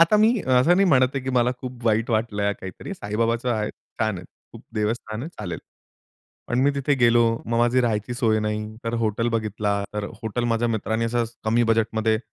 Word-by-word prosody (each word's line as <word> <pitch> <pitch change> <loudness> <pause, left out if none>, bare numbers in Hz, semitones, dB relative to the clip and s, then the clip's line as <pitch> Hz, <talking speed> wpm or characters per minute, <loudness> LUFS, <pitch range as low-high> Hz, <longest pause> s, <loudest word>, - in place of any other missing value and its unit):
आता 170 +6 +6
मी 215 +2 +5 0.2
असं 130 +7 +5
नाही 195 - +4
म्हणत 130 -4 +5
आहे, 135 - -1
की 130 - -1
मला 125 -1 +3
खूप 125 -2 -8
वाईट 110 +2 +2
वाटलं, 105 -2 0
काहीतरी. 95 - -7
साईबाबाचं 115 - -1
आहे, 105 -1 -1
छान 110 -3 -4
आहे. 90 - -10 0.3
खूप - - -12
देवस्थान 110 +1 -2
आहे, 155 - -5
चालेल. - - -4 0.9
पण 120 - 0
मी 140 - +4
तिथे 140 +1 +1
गेलो. 120 0 +5 0.2
मग 115 0 0
माझी 120 +2 +3
राहायची 115 -1 -1
सोय 115 -3 +2
नाही. 105 0 -3
तर 115 - -1
हॉटेल 110 +2 0
बघितला, 105 -3 -1
तर 105 -1 -2 0.2
हॉटेल 115 +2 -2
माझ्या 115 +1 +1
मित्रांनी 110 +1 -1
असं 120 +1 0 0.2
कमी 115 +2 +3
बजेटमध्ये 110 0 +1
115 Hz, 190 wpm, -24 LUFS, 110-125 Hz, 0.9 s, आता